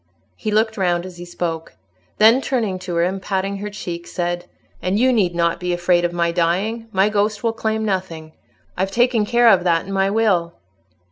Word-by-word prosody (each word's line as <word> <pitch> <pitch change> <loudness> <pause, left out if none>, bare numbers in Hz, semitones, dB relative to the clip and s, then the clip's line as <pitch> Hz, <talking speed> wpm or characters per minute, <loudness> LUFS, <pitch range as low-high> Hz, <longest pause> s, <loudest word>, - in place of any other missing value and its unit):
He 215 - -4
looked 220 +1 +1
round 175 -2 0
as 185 -1 -10
he 175 - -8
spoke. 165 -2 -5 0.4
Then, 225 +5 +6
turning 225 -9 -1
to 180 -1 -5
her, 170 - +2
and 190 +2 -2
patting 195 +1 -2
her 205 +1 -5
cheek, 170 -4 -6
said, 175 0 -3 0.4
"And 185 +2 0
you 255 +3 +3
need 185 -7 +1
not 170 -1 +1
be 180 0 -2
afraid 175 0 +2
of 175 - 0
my 170 -1 0
dying; 190 +7 -1
my 195 0 +3
ghost 210 0 0
will 230 -1 +1
claim 220 -1 -2
nothing. 180 -6 -3 0.4
I've 190 +1 -1
taken 230 0 +2
care 240 +1 +4
of 190 -5 +4
that 170 -2 +1
in 195 - -6
my 195 0 +2
will." 195 -6 +1
190 Hz, 200 wpm, -20 LUFS, 175-215 Hz, 0.4 s, Then